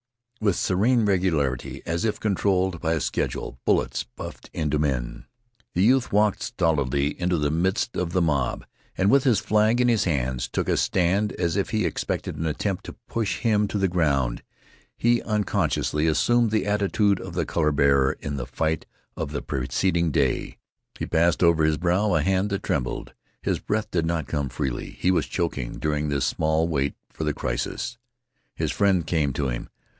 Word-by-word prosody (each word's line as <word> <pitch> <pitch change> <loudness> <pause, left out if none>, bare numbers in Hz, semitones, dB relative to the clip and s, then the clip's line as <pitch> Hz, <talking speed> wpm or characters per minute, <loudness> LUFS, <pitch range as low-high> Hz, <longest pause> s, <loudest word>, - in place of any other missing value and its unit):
With 100 -4 +2
serene 110 +5 +2
regularity, 80 -10 0
as 85 0 -1
if 105 -2 0
controlled 95 -4 +1
by 80 -1 +1
a 80 - 0
schedule, 60 - -3
bullets - - +1
buffed - - -10
into 75 -2 -1
men. 65 -5 -2 0.5
The 90 - +3
youth 125 +3 +3
walked 105 0 +2
stolidly 70 -5 +1
into 90 0 +1
the 75 -1 0
midst 95 +8 0
of 90 -2 -1
the 90 0 +2
mob, 70 -6 0 0.3
and 95 +2 +3
with 140 0 +5
his 120 -6 +4
flag 110 +3 +2
in 125 - +4
his 115 -3 +3
hands 65 -6 -1
took - - -2
a - - +2
stand 95 +3 +1
as 85 -1 -1
if 100 - 0
he 110 -1 0
expected - - -2
an 80 - -2
attempt 90 +5 -2
to - - -8
push 110 -4 -2
him 105 -3 +2
to 105 - -3
the 95 -1 +2
ground. 70 -9 +1 0.6
He 120 0 +3
unconsciously 100 -7 0
assumed 120 +9 +3
the 110 -3 0
attitude 105 -1 +2
of 90 -2 -8
the 85 - 0
color 75 -2 +1
bearer 70 -2 +3
in 70 -1 -4
the 65 -1 -4
fight 80 +5 -1 0.3
of 70 - -4
the 70 - -3
preceding 85 +7 0
day. 70 -3 0 0.4
He - - -3
passed 85 +2 +2
over 85 -2 +4
his 80 0 +2
brow 90 +3 +1
a - - +2
hand 95 +2 +1
that 100 -1 -3
trembled. 65 -4 -2 0.3
His - - 0
breath 105 +1 -2
did 85 -2 0
not 80 -3 -1
come 70 -1 -2
freely. 65 -1 -3
He 90 - +2
was 90 - +1
choking 75 -9 -2
during 75 -1 -1
this 70 -2 0
small 80 +1 +1
wait 70 -4 -1 0.2
for - - -4
the 75 -1 0
crisis. 85 - -3 0.6
His - - -1
friend 95 -5 +2
came 75 -3 +1
to 70 0 -1
him. - - -4
85 Hz, 180 wpm, -25 LUFS, 75-100 Hz, 0.6 s, with